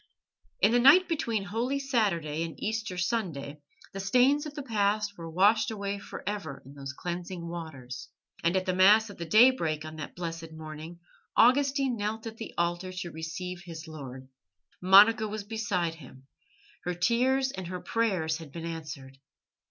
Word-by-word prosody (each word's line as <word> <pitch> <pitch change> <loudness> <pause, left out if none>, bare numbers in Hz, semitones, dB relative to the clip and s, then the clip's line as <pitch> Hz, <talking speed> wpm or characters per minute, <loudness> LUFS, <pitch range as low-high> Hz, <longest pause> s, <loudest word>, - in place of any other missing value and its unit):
In 210 - +5
the 245 - +4
night 290 +9 +7
between 230 - -1
Holy 230 +7 -1
Saturday 200 - 0
and 165 -1 -5
Easter 220 -4 -3
Sunday 170 -8 -2 0.3
the 195 - -5
stains 255 +9 +3
of 290 - -9
the 290 - -5
past 210 -3 0
were 165 -2 -8
washed 210 +6 +4
away 200 -2 -3
for - - -9
ever 200 -9 -4
in 135 - -12
those 140 -1 -7
cleansing 175 +3 -5
waters, 155 -7 -7 0.3
and 170 +3 +2
at 185 - -1
the 185 - 0
Mass 205 +4 +5
of - - -13
the 170 - -5
daybreak 210 -9 +4
on 155 0 -8
that 155 - -7
blessed 165 -2 -6
morning 160 +1 -8 0.4
Augustine 270 0 +4
knelt 215 +2 -3
at 225 0 -7
the 225 - -8
altar 175 +2 -1
to 185 -2 -5
receive 175 +3 -6
his 165 -2 -9
Lord. 135 -4 -9 0.5
Monica 210 +4 +7
was 210 0 -5
beside 205 -6 -1
him; 135 -4 -14 0.6
her 180 0 -2
tears 260 +7 +2
and 190 -5 -6
her 180 +1 -5
prayers 185 -8 0
had 160 -4 -11
been 165 +1 -6
answered. 150 -5 -7
185 Hz, 165 wpm, -29 LUFS, 160-220 Hz, 0.6 s, night